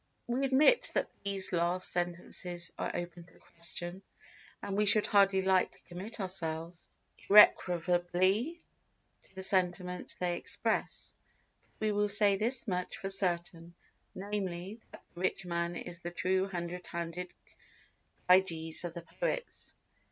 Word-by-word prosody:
We 255 +3 -1
admit 300 - +4
that - - -1
these 195 -2 0
last 175 +2 +1
sentences 175 0 -2
are - - -2
open 175 0 -6
to 170 - -22 0.2
question, 175 +2 -6 0.6
and 195 - -4
we 210 +1 +2
should 210 +1 +6
hardly 195 -2 +3
like 190 -1 +2
to - - -27
commit 190 +6 -9
ourselves 170 -3 -4 0.5
irrecoverably 185 - +4 0.7
to - - -28
the 190 - -2
sentiments 180 -1 +2
they 175 -1 -2
express; - - -2 0.6
but 215 - -3
we 215 - +1
will 205 0 0
say 205 -1 +6
this 235 +5 +2
much 180 +1 -3
for 195 -3 -3
certain, 175 -3 0 0.4
namely, 195 +1 -5
that - - -14
the 175 - -10
rich 185 0 -1
man 170 0 -2
is 170 0 -7
the 175 - -6
true 185 +2 0
hundred 180 -1 -6
handed 170 +1 -5 1.0
Gyges 165 -3 +3
of 175 0 -6
the 170 - -7
poets. - - -5
180 Hz, 135 wpm, -31 LUFS, 175-200 Hz, 1.0 s, should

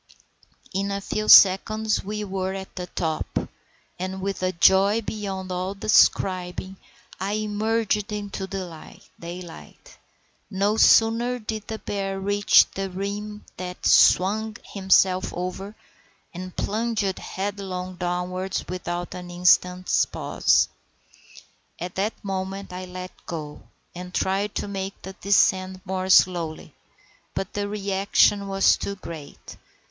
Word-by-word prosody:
In 195 +1 -1
a 200 0 -2
few 215 +2 -3
seconds 215 +3 +6
we 210 +1 -4
were 190 -1 -3
at 190 0 -8
the 180 -1 -5
top, 160 -3 -3 0.6
and 185 +1 -4
with 195 0 -3
a 185 0 +1
joy 195 +5 +4
beyond 195 -3 -5
all 185 +2 -3
describing 190 -2 +2 0.4
I 195 +2 -2
emerged 215 0 -1
into 205 -2 -4
daylight. 175 - -10 0.5
No 200 +3 0
sooner 230 +3 +4
did 215 -2 -6
the 220 - -4
bear 195 -2 -3
reach 205 +1 +5
the 195 0 -4
rim 205 +3 -5
than 180 0 -5
he - - +2
swung 215 +4 +4 0.2
himself 190 -1 +3
over, 185 +3 -5 0.6
and 185 +1 -8
plunged 215 -3 -1
headlong 190 -2 -5
downwards 180 +1 -2
without 175 -1 -4
an 180 -1 -8
instant's 180 +1 +3
pause. - - +2 1.1
At 180 +1 -5
that 205 +4 -1
moment 195 0 -4
I 185 0 -6
let 185 0 -7 0.2
go, 150 -3 -7 0.3
and 180 +1 -8
tried 200 +2 0
to - - -2
make 195 -1 -5
the 190 - -7
descent 190 -1 +1
more 185 0 -3
slowly; 175 -4 +3 0.6
but 195 - -4
the 205 0 -2
reaction 200 0 +2
was 195 0 +3
too 200 - -4
great. 160 -6 -10
190 Hz, 120 wpm, -24 LUFS, 185-205 Hz, 1.1 s, seconds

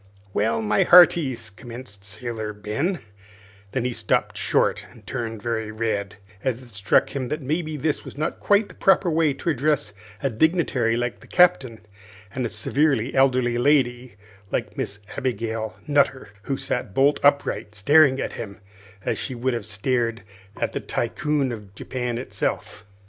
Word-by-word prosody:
"Well, 110 +1 +1
my 105 0 +2
hearties," 145 - +5
commenced 115 -2 -9
Sailor 110 +1 -5
Ben 110 - -2 0.7
then 125 -2 -1
he 125 - -1
stopped 110 -2 0
short - - +1
and 115 -4 -18
turned 115 -4 -4
very 110 -2 -2
red, 110 -3 -2 0.3
as 130 -1 -1
it 125 - -15
struck 105 -3 +2
him 130 -2 -2
that 150 +2 -4
maybe 155 +2 -2
this 150 +2 -1
was - - -10
not 155 +2 -2
quite 205 +1 +3
the - - -13
proper 190 -2 +3
way 160 -1 +3
to 170 - -1
address 145 -5 0 0.3
a 135 - +1
dignitary 130 -4 +2
like 120 0 -2
the - - -16
Captain 135 -11 +3 0.5
and 125 -2 -1
a - - -8
severe 130 +3 +1
elderly 130 -3 +3
lady 125 -3 +2 0.3
like - - -3
Miss 100 +1 -4 0.2
Abigail 115 -3 -2
Nutter, 140 -5 +1 0.2
who 135 - -1
sat 115 -8 -3
bolt 140 +2 +4
upright 140 -7 +1
staring 135 +5 +5
at - - -3
him 100 -4 -7 0.5
as - - -1
she 130 - -4
would 125 +2 -1
have 115 -2 -3
stared 115 +2 -1 0.4
at - - -1
the - - -2
Tycoon 150 -3 -1
of 105 -4 -9
Japan 125 +1 -3
himself. 120 -4 -4
125 Hz, 160 wpm, -24 LUFS, 110-145 Hz, 0.7 s, hearties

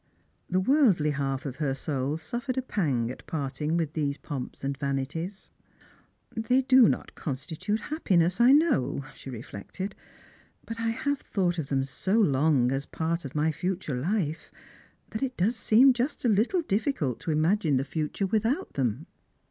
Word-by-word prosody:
The 185 - +2
worldly 195 - +4
half 135 -1 -2
of 135 -2 -5
her 140 -4 0
soul 140 +1 -2
suffered 240 +10 -4
a 260 - 0
pang 135 - 0
at - - -11
parting 150 +2 -2
with 160 -3 -1
these 145 -2 -1
pomps 135 -2 -6
and 140 0 -1
vanities. 140 +7 -4 0.4
" - - -34
They 250 +4 +2
do 260 -3 +7
not - - -3
constitute 160 +8 -3
happiness, 185 - +1
I 245 +2 +7
know," 280 - +3
she - - -10
reilected; 130 - -6 0.4
" - - -30
but 230 0 -6
I 230 - -1
have 285 +5 -1
thought 175 -3 0
of 145 - -3
them 135 -1 +1
so 190 +11 0
long 140 - +3
as 135 +1 -1
a - - -31
part 165 0 -2
of 135 - -7
my 155 +1 +2
future 180 -1 -3
life, 160 - -1 0.6
that 220 - -4
it 260 -2 -2
does 210 +7 +2
seem 245 +4 +5
just 250 +3 -2
a - - +4
little 230 - +2
difficult 200 - -1
to 165 - -3
imagine 155 -1 +2
the 135 - 0
future 155 +6 -2
with 210 +2 +1
out 295 +10 -2
them." 130 +2 -1
165 Hz, 175 wpm, -28 LUFS, 140-225 Hz, 0.6 s, do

